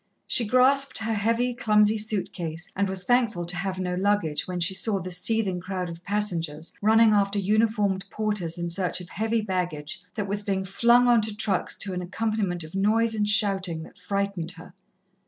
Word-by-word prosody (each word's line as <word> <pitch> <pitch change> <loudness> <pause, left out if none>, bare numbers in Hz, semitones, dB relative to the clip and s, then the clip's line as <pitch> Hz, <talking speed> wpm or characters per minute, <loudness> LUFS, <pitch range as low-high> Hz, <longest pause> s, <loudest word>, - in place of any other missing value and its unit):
She 235 - +1
grasped 260 +3 +3
her 225 0 -1
heavy, 230 +4 0
clumsy 215 -2 +3
suit 210 -2 -2
case 165 -1 -5
and 200 0 0
was 190 -1 -2
thankful 230 -6 +1
to 175 +1 -3
have 190 +1 -3
no 180 -1 -2
luggage, 185 -5 0
when 180 -1 -3
she 175 +3 +2
saw 195 +2 0
the 185 0 -6
seething 190 0 +1
crowd 185 -1 -4
of 170 +1 -11
passengers, 170 -6 -2
running 220 +1 +5
after 200 0 +2
uniformed 205 -1 +1
porters 205 -7 -2
in 170 0 -3
search 180 +1 0
of 180 -2 -10
heavy 220 +3 -1
baggage 180 -7 -3
that 205 -2 -2
was 205 +1 -1
being 195 -2 -2
flung 235 +6 +4
on 240 -2 +5
to 215 -1 -2
trucks 205 -4 -1
to 195 -2 -3
an 180 - -3
accompaniment 195 -2 -2
of 155 - -11
noise 220 +4 +2
and 210 -1 0
shouting 190 -5 +1
that 180 - -15
frightened 195 -2 -2
her. 175 -1 -13
200 Hz, 190 wpm, -25 LUFS, 180-220 Hz, -, running